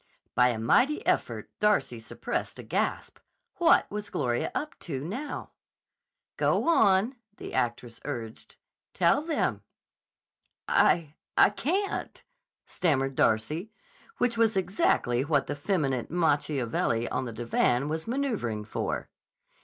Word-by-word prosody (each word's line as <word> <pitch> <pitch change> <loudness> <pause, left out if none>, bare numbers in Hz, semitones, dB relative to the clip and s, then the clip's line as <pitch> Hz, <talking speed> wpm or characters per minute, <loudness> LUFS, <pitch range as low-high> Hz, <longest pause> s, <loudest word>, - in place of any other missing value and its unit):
By 125 0 +5
a 120 -2 0
mighty 250 - +2
effort - - -1
Darcy 210 - +2
suppressed 115 - -4
a - - -8
gasp. - - -2 0.4
What - - +5
was 210 0 -5
Gloria 120 -4 -1
up 300 - -4
to, 135 -5 -5
now? 255 - -5 0.9
"Go - - +1
on," 225 - +4 0.2
the - - -8
actress 120 -1 -2
urged. 115 -2 -6 0.4
"Tell 290 - +3
them." 320 +1 -1 1.1
"I 155 -4 +3 0.2
I - - +7
can't," 375 - -2 0.4
stammered 135 -6 0
Darcy, 130 - +1 0.5
which 235 -2 0
was 225 -3 +3
exactly 175 - +1
what 145 -1 +1
the 145 - -3
feminine 145 - -1
Macchiavelli 145 -8 +1
on 130 - -1
the 120 - -5
divan 120 +3 +1
was 160 +4 -3
maneuvering 225 - -2
for. 110 - -3
150 Hz, 120 wpm, -28 LUFS, -, 1.1 s, I